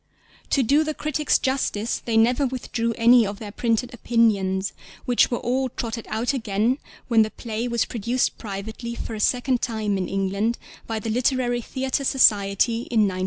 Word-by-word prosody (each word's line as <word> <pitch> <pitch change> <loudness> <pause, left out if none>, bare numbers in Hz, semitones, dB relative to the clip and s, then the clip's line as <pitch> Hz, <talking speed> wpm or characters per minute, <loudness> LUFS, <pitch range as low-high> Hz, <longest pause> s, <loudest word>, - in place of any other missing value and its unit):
To 275 - +2
do 285 +6 +3
the 310 -1 -3
critics 305 0 +1
justice 260 -5 -1
they 230 -2 0
never 245 +5 +3
withdrew 235 -2 -2
any 235 +1 +6
of 200 -1 -4
their 210 -2 -8
printed 235 +3 -1
opinions, 205 -5 +1 0.3
which 245 -1 +3
were 240 - -1
all 260 +2 -1
trotted 230 -1 -5
out 230 +5 0
again 230 +1 0 0.3
when 230 -2 +4
the 215 - +2
play 225 +1 -4
was 235 -1 0
produced 240 +2 -1
privately 220 +3 -6
for 230 - -6
the 215 - -5
second 250 +3 +1
time 215 -4 -1
in 185 - -3
England 195 +4 -1 0.3
by 225 - -2
the 220 +1 -3
Literary 245 0 +1
Theatre 265 +3 -2
Society 225 -2 +3
in 225 -3 +3
1906. 190 -3 +1
230 Hz, 170 wpm, -23 LUFS, 215-250 Hz, 0.3 s, any